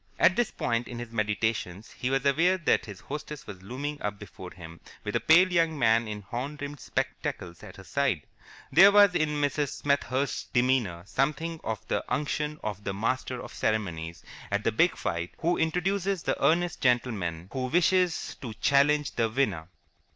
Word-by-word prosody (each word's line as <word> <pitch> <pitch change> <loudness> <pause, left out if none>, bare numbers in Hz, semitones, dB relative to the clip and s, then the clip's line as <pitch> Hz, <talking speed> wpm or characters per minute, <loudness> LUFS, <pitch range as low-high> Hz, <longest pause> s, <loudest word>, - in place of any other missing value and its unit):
At 185 - +5
this 240 - +1
point 115 0 -1
in 120 - -7
his 120 -1 -7
meditations 105 -2 -2
he 125 - -3
was 135 +1 0
aware 165 +7 +3
that 170 -7 +1
his 100 -3 -9
hostess 150 +1 -7
was 95 -5 -9
looming 140 +8 -5
up 105 0 -3
before 95 -3 -10
him 85 -2 -11 0.2
with - - -4
a - - +3
pale 180 +3 +5
young 165 -2 +2
man 115 -2 +3
in 105 -1 -6
horn 125 +9 -5
rimmed 145 0 -6
spectacles 85 -1 -4
at - - -11
her 95 - -11
side. 135 - 0 0.5
There 195 +4 +8
was 205 -2 +6
in 150 -3 0
Mrs. 145 0 0
Smethurst's 140 -1 0
demeanour 120 -9 +1
something 155 +8 -1
of 110 -2 -4
the - - -1
unction 150 +1 -1
of 105 -1 -4
the 100 -1 -3
master 125 +4 -1
of - - -9
ceremonies 85 -7 -2 0.3
at 100 +1 -1
the 115 - +2
big 165 +11 +2
fight 85 -4 -3
who 170 +2 +1
introduces 185 +3 0
the - - -1
earnest 175 +1 +2
gentleman 105 - 0
who 130 -1 -2
wishes 180 +3 +2
to 115 -5 -6
challenge 145 +3 +3
the 115 -2 0
winner. 105 -10 -1
130 Hz, 175 wpm, -28 LUFS, 105-150 Hz, 0.5 s, There